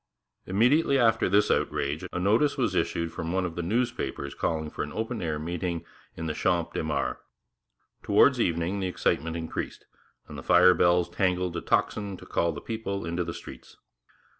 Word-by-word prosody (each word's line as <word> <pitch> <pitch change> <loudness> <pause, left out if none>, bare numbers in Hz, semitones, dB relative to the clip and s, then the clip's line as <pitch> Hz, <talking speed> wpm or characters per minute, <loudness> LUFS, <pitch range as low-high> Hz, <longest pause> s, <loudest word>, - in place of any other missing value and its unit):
Immediately 130 - +3
after 115 -7 +3
this 100 +2 +3
outrage 70 +2 -1
a - - -4
notice 110 +10 +2
was - - +1
issued 85 0 -1
from 85 0 -4
one 95 0 0
of 85 - -4
the 85 - -2
newspapers 110 - -2
calling 80 -2 -2
an 75 - -3
open 115 +1 -3
air 80 -3 -1
meeting 85 +2 -3 0.3
in 80 - -4
the 80 - -1
Champ - - 0
de - - -2
Mars. - - -1 0.8
Towards - - +4
evening 85 +4 0
the 95 - -1
excitement 80 -2 -1
increased, 80 -1 -5 0.4
and - - -8
the - - -7
fire 90 +1 +6
bells 85 0 +3
jangled 90 -2 0
a 85 - -2
tocsin 100 -3 0
to - - -13
call 85 - 0
the 75 - -7
people 105 -3 -4
into 85 +1 -1
the 85 - -4
streets. - - -11
90 Hz, 175 wpm, -27 LUFS, 85-100 Hz, 0.8 s, fire